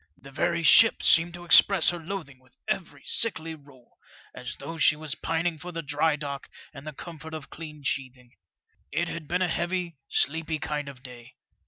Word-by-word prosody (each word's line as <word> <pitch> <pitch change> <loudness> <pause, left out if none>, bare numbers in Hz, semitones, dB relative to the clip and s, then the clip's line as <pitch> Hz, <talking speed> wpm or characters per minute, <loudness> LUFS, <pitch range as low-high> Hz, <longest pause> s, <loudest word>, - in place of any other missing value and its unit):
The 135 +1 -13
very 170 +4 0
ship 225 +7 +7
seemed 170 +1 +4
to 175 0 -10
express 175 +1 +7
her 175 - -6
loathing 160 -6 -6
with 125 -2 -27
every 185 - -3
sickly 165 -8 -1
roll, 140 -5 -18 0.3
as 125 -1 -6
though 160 +4 -7
she 150 - +5
was 150 -2 -2
pining 165 0 -2
for 180 +3 -7
the 165 -1 -4
dry 150 +2 +1
dock 140 -2 -6 0.2
and 135 +2 -10
the 155 - -5
comfort 160 +1 -8
of 155 -3 -8
clean 150 -2 -9
sheathing. 130 -2 -3 0.6
It 170 0 -1
had 155 -3 -6
been 180 +3 +1
a - - +2
heavy, 175 -1 -2
sleepy 160 +1 0
kind 150 -1 -3
of 130 -2 -13
day. 120 -3 -12
155 Hz, 185 wpm, -27 LUFS, 140-170 Hz, 0.6 s, ship